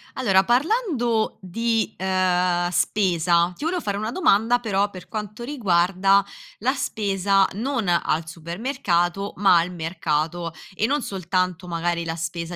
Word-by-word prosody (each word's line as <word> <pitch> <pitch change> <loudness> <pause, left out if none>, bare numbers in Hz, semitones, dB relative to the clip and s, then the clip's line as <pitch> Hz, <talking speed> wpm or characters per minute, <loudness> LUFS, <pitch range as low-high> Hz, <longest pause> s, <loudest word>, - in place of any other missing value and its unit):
Allora 195 -7 +3
parlando 245 - +1
di, 225 +4 -1
ehm, 180 -2 +1
spesa, 175 -2 +2
ti - - -8
volevo 345 +2 -1
fare 200 -1 -2
una 215 +2 -3
domanda 245 - +3
però 205 -3 0
per 185 -2 -11
quanto 210 +1 -6
riguarda 195 -6 +2 0.4
la 255 +5 +1
spesa 195 -6 +1
non 235 -1 -2
al 165 -2 +1
supermercato 175 - -2
ma 190 -2 +5
al 170 +2 0
mercato 165 0 -2 0.2
e 210 - +1
non 285 +5 0
soltanto 185 -2 -2
magari 170 0 -2
la 165 0 -3
spesa 170 +1 -4
190 Hz, 135 wpm, -23 LUFS, 175-225 Hz, 0.4 s, ma